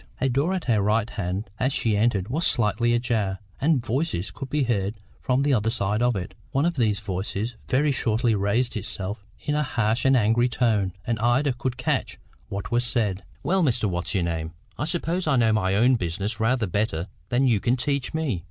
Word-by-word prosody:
A 135 Hz, -, +1 dB
door 140 Hz, +9 st, +1 dB
at 180 Hz, -, -3 dB
her 110 Hz, -5 st, +2 dB
right 105 Hz, +2 st, +2 dB
hand 95 Hz, 0 st, -3 dB
as 130 Hz, +2 st, +1 dB
she 115 Hz, -5 st, +1 dB
entered 105 Hz, -3 st, +1 dB
was 155 Hz, +7 st, +2 dB
slightly 120 Hz, +1 st, +2 dB
ajar, 110 Hz, -5 st, 0 dB, 0.2 s
and 140 Hz, -4 st, +2 dB
voices 120 Hz, -, -1 dB
could 135 Hz, -2 st, -7 dB
be 150 Hz, 0 st, +1 dB
heard 105 Hz, -4 st, 0 dB, 0.2 s
from 130 Hz, +1 st, +1 dB
the 145 Hz, -1 st, +2 dB
other 110 Hz, -2 st, +2 dB
side 105 Hz, -1 st, 0 dB
of 120 Hz, -1 st, +2 dB
it. 90 Hz, -2 st, -4 dB, 0.2 s
One 140 Hz, +3 st, +1 dB
of 175 Hz, -, +1 dB
these 110 Hz, -6 st, +1 dB
voices 100 Hz, +3 st, -3 dB, 0.2 s
very 145 Hz, +3 st, +3 dB
shortly 115 Hz, -2 st, +1 dB
raised 105 Hz, +5 st, +1 dB
itself 100 Hz, 0 st, -4 dB, 0.2 s
in 150 Hz, -, -1 dB
a 150 Hz, -, +2 dB
harsh 115 Hz, -5 st, 0 dB
and 135 Hz, 0 st, +5 dB
angry 120 Hz, +2 st, +3 dB
tone, 105 Hz, -7 st, +1 dB
and 115 Hz, -3 st, -1 dB
Ida 125 Hz, +4 st, +2 dB
could 125 Hz, 0 st, -3 dB
catch 125 Hz, -, -1 dB, 0.3 s
what 100 Hz, +4 st, -5 dB
was 120 Hz, +1 st, +2 dB
said. 110 Hz, -6 st, -1 dB, 0.2 s
"Well, 190 Hz, +1 st, +2 dB
Mr. 125 Hz, -8 st, +1 dB
What's 85 Hz, 0 st, -2 dB
your 95 Hz, -, +2 dB
name, 80 Hz, -1 st, -3 dB, 0.2 s
I -, -, -2 dB
suppose 170 Hz, +2 st, -1 dB
I 145 Hz, -, +3 dB
know 115 Hz, -3 st, +4 dB
my 95 Hz, -3 st, +1 dB
own 120 Hz, +4 st, +4 dB
business 100 Hz, +5 st, -3 dB
rather 115 Hz, +1 st, +2 dB
better 90 Hz, -3 st, -1 dB, 0.2 s
than 125 Hz, +3 st, +2 dB
you 115 Hz, -5 st, +3 dB
can 120 Hz, +5 st, +2 dB
teach 140 Hz, 0 st, -1 dB
me. 155 Hz, -, -1 dB
115 Hz, 205 wpm, -25 LUFS, 100-130 Hz, 0.3 s, and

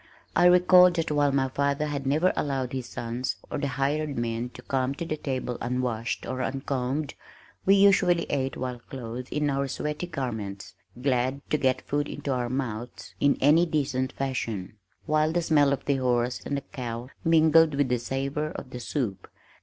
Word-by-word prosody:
I 175 Hz, +1 st, +6 dB
recalled 180 Hz, 0 st, +7 dB
that 165 Hz, -2 st, -1 dB
while 145 Hz, -1 st, +3 dB
my 135 Hz, -1 st, +2 dB
father 140 Hz, +2 st, 0 dB
had 140 Hz, -2 st, -3 dB
never 155 Hz, +7 st, +3 dB
allowed 135 Hz, -3 st, -2 dB
his 130 Hz, -2 st, -3 dB
sons 120 Hz, +2 st, -3 dB, 0.2 s
or 150 Hz, -, -2 dB
the 140 Hz, -, -1 dB
hired 140 Hz, +2 st, -1 dB
men 120 Hz, +1 st, -2 dB
to 125 Hz, -, -10 dB
come 130 Hz, +1 st, -1 dB
to 170 Hz, -, -4 dB
the 155 Hz, -, -2 dB
table 130 Hz, -4 st, -3 dB
unwashed 120 Hz, -2 st, -2 dB
or 130 Hz, -, -3 dB
uncombed, 135 Hz, +2 st, -2 dB, 0.5 s
we 195 Hz, -, +7 dB
usually 195 Hz, -3 st, +5 dB
ate 135 Hz, -2 st, -2 dB
while 125 Hz, -1 st, -4 dB
clothed 125 Hz, 0 st, -6 dB
in 150 Hz, -1 st, 0 dB
our 140 Hz, 0 st, 0 dB
sweaty 150 Hz, +5 st, -3 dB
garments, 110 Hz, -, -5 dB, 0.3 s
glad 130 Hz, +1 st, 0 dB
to 150 Hz, -, +3 dB
get 130 Hz, -1 st, +1 dB
food 145 Hz, +1 st, -1 dB
into 145 Hz, -1 st, -4 dB
our 125 Hz, -1 st, -1 dB
mouths 125 Hz, -3 st, -4 dB
in 140 Hz, 0 st, +3 dB
any 160 Hz, +5 st, +5 dB
decent 135 Hz, -4 st, -1 dB
fashion, 115 Hz, -8 st, -3 dB, 0.3 s
while 155 Hz, +1 st, +2 dB
the 175 Hz, +1 st, 0 dB
smell 145 Hz, -4 st, +4 dB
of 140 Hz, -, -2 dB
the 140 Hz, -1 st, +2 dB
horse 125 Hz, -1 st, 0 dB
and 140 Hz, -, -1 dB
the -, -, -3 dB
cow 120 Hz, -2 st, -6 dB
mingled 160 Hz, -2 st, +5 dB
with 140 Hz, -2 st, +1 dB
the 125 Hz, -1 st, +1 dB
savor 135 Hz, +5 st, -2 dB
of 130 Hz, -, -8 dB
the 125 Hz, -, -6 dB
soup. 120 Hz, -6 st, -3 dB
135 Hz, 180 wpm, -27 LUFS, 125-150 Hz, 0.5 s, recalled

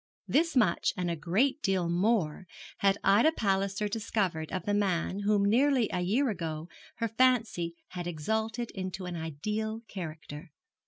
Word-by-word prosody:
This 330 Hz, +2 st, +2 dB
much 220 Hz, -9 st, +2 dB
and 180 Hz, -1 st, -1 dB
a -, -, -1 dB
great 215 Hz, -, +1 dB
deal 190 Hz, -3 st, +1 dB
more 180 Hz, -1 st, +1 dB, 0.3 s
had 195 Hz, 0 st, +3 dB
Ida 205 Hz, +12 st, +5 dB
Palliser 195 Hz, -3 st, 0 dB
discovered 200 Hz, -7 st, -2 dB
of 185 Hz, -, -3 dB
the 205 Hz, -, 0 dB
man 195 Hz, -2 st, 0 dB
whom 205 Hz, 0 st, +2 dB
nearly 250 Hz, +2 st, +3 dB
a 180 Hz, -, 0 dB
year 230 Hz, +8 st, +2 dB
ago 165 Hz, -3 st, -5 dB, 0.3 s
her 230 Hz, -, -1 dB
fancy 225 Hz, -8 st, +2 dB
had 175 Hz, -1 st, -5 dB
exalted 220 Hz, +8 st, -2 dB
into 185 Hz, -1 st, -5 dB
an 180 Hz, -1 st, -4 dB
ideal 210 Hz, +8 st, -3 dB
character. 155 Hz, -4 st, -7 dB
195 Hz, 150 wpm, -30 LUFS, 175-220 Hz, 0.3 s, Ida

